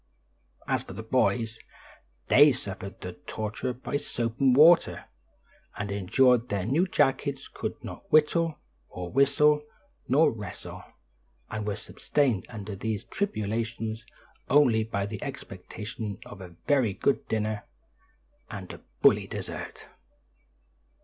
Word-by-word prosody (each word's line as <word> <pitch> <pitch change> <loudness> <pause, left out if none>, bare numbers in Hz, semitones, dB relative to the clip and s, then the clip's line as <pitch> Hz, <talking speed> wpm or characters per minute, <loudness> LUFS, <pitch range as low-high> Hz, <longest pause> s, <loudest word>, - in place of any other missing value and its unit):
As - - +1
for - - -10
the 110 +4 -7
boys, 115 -1 +1 0.7
they 145 +2 +7
suffered 100 -4 -6
the 90 -1 -6
torture 110 +3 -3
by 130 +3 -3
soap 115 -4 -3
and 135 -2 +5
water, 165 +4 +6 0.7
and 100 0 -3
endured 120 +5 +3
their 100 -3 -1
new 155 - +2
jackets, 135 -4 +1
could - - -5
not - - -9
whittle, 155 +1 +3 0.3
nor 90 -1 -6
whistle, 145 +3 +4 0.5
nor 145 +6 +4
wrestle, 105 -5 -8 0.7
and 105 -1 -3
were 105 - -1
sustained 130 -10 -1
under 105 -3 -6
these 110 +1 -3
tribulations 115 - -2 0.5
only 125 -5 +5
by 100 -3 -2
the 105 +1 -6
expectation 105 -4 -6
of 100 - -10
a 90 -2 -10
very 130 -8 +3
good 135 - 0
dinner 110 -1 -2 0.8
and - - -7
a - - -11 0.2
"bully" - - +5
dessert! - - -6
115 Hz, 125 wpm, -28 LUFS, 105-140 Hz, 0.8 s, they